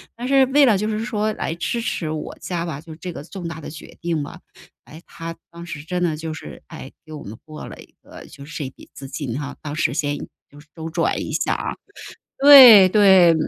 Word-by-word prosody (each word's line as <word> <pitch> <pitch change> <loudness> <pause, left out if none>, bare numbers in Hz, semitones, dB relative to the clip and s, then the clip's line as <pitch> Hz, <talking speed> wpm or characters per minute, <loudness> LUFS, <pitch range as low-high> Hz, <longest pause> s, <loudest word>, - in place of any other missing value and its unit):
但 245 +2 -6
是 270 -1 +4
为 280 +2 +4
了 215 -6 +3
就 215 +2 -2
是 215 +2 -3
说 215 -2 -1
来 160 - -4
支 175 +7 -3
持 165 -8 -3
我 155 -1 -6
家 175 -2 -3
吧， 150 -3 -6
就 160 -1 -11
这 180 +1 -7
个 145 - -8
重 175 +1 -8
大 165 -1 -7
的 - - -8
决 155 +1 -12
定 165 -3 -2
吧。 - - -10 0.5
诶， 155 +3 -13
他 165 0 -8 0.2
当 170 0 -10
时 155 -3 -8
真 180 +2 -4
的 160 -3 0
就 160 0 -5
是， - - -11
哎， 150 -5 -10
给 155 - -14
我 150 - -8
们 110 +3 -10
拨 155 -1 -10
了 - - -11
一 - - -16
个 - - -13
就 140 - -13
是 155 - -9
这 145 - -4
一 - - -5
笔 - - -18
资 135 - -10
金 135 -5 -5
啊， 140 -1 -6
当 150 -1 -6
时 155 -4 0
先 145 -1 -2 0.3
就 145 - -15
是 155 - -18
周 160 -1 -6
转 160 - -1
一 - - -6
下 - - 0
啊， - - -4 0.6
对 255 -9 +10
对。 190 -4 +6
165 Hz, 260 characters per minute, -21 LUFS, 150-195 Hz, 0.6 s, 对